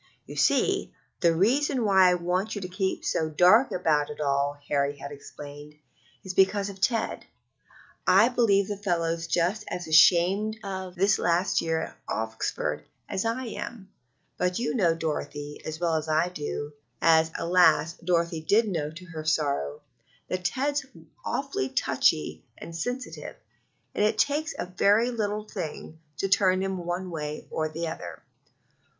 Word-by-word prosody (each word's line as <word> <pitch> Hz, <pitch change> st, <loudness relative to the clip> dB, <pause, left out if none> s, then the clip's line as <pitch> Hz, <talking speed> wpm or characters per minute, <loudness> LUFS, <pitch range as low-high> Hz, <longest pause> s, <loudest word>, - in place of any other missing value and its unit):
"You -, -, -9 dB
see, -, -, +2 dB, 0.3 s
the 170 Hz, -3 st, +3 dB
reason 250 Hz, -, +2 dB
why 190 Hz, -2 st, +6 dB
I 180 Hz, -, +3 dB
want 180 Hz, +5 st, -1 dB
you 205 Hz, -, -4 dB
to 180 Hz, -, -4 dB
keep 190 Hz, +1 st, -2 dB
so 160 Hz, -1 st, 0 dB
dark 180 Hz, -, +5 dB
about 150 Hz, -4 st, +1 dB
it 150 Hz, -, -8 dB
all," 140 Hz, 0 st, 0 dB
Harry 140 Hz, 0 st, 0 dB
had 140 Hz, +1 st, -8 dB
explained, 145 Hz, +1 st, -10 dB, 0.5 s
"is 190 Hz, -, -5 dB
because 195 Hz, +1 st, +3 dB
of 195 Hz, -1 st, -11 dB
Ted. 230 Hz, +2 st, 0 dB, 0.8 s
I 200 Hz, +5 st, +6 dB
believe 205 Hz, -6 st, +3 dB
the 205 Hz, -, -4 dB
fellow's 170 Hz, -4 st, -1 dB
just 180 Hz, +6 st, 0 dB
as 175 Hz, -2 st, -5 dB
ashamed 185 Hz, +7 st, +5 dB
of 190 Hz, -2 st, -5 dB
this 195 Hz, +2 st, +3 dB
last 175 Hz, +2 st, +2 dB
year 160 Hz, -1 st, 0 dB
at -, -, -9 dB
Oxford 110 Hz, 0 st, -2 dB, 0.2 s
as 190 Hz, -, -2 dB
I 240 Hz, +3 st, -1 dB
am, 210 Hz, -3 st, -7 dB, 0.5 s
but 180 Hz, 0 st, 0 dB
you 235 Hz, 0 st, -1 dB
know, 175 Hz, -9 st, +2 dB
Dorothy, 150 Hz, -2 st, -4 dB
as 155 Hz, 0 st, -5 dB
well 170 Hz, -2 st, +1 dB
as 160 Hz, 0 st, -1 dB
I 160 Hz, +3 st, +2 dB
do 150 Hz, -3 st, -5 dB, 0.3 s
(as, 160 Hz, -1 st, +4 dB
alas! 170 Hz, -2 st, +3 dB
Dorothy 170 Hz, -2 st, 0 dB
did 215 Hz, +8 st, +3 dB
know 155 Hz, -5 st, -2 dB
to 170 Hz, +4 st, -11 dB
her 160 Hz, -3 st, -7 dB
sorrow), 140 Hz, -, -1 dB, 0.5 s
that 185 Hz, -1 st, -3 dB
Ted's 280 Hz, +7 st, 0 dB, 0.4 s
awfully 270 Hz, -, -2 dB
touchy 75 Hz, -8 st, +1 dB
and 165 Hz, -, -9 dB
sensitive, 245 Hz, +9 st, -5 dB, 0.6 s
and -, -, 0 dB
it 215 Hz, +1 st, +2 dB
takes 295 Hz, +7 st, +1 dB
a -, -, -3 dB
very 205 Hz, +6 st, +3 dB
little 210 Hz, -2 st, -2 dB
thing 160 Hz, -4 st, -6 dB, 0.2 s
to 195 Hz, -, 0 dB
turn 190 Hz, -1 st, +3 dB
him 190 Hz, -1 st, -2 dB
one 180 Hz, +1 st, -3 dB
way 150 Hz, -2 st, -5 dB
or 155 Hz, 0 st, -1 dB
the 165 Hz, +2 st, -4 dB
other. 160 Hz, -, -7 dB
180 Hz, 155 wpm, -27 LUFS, 160-205 Hz, 0.8 s, why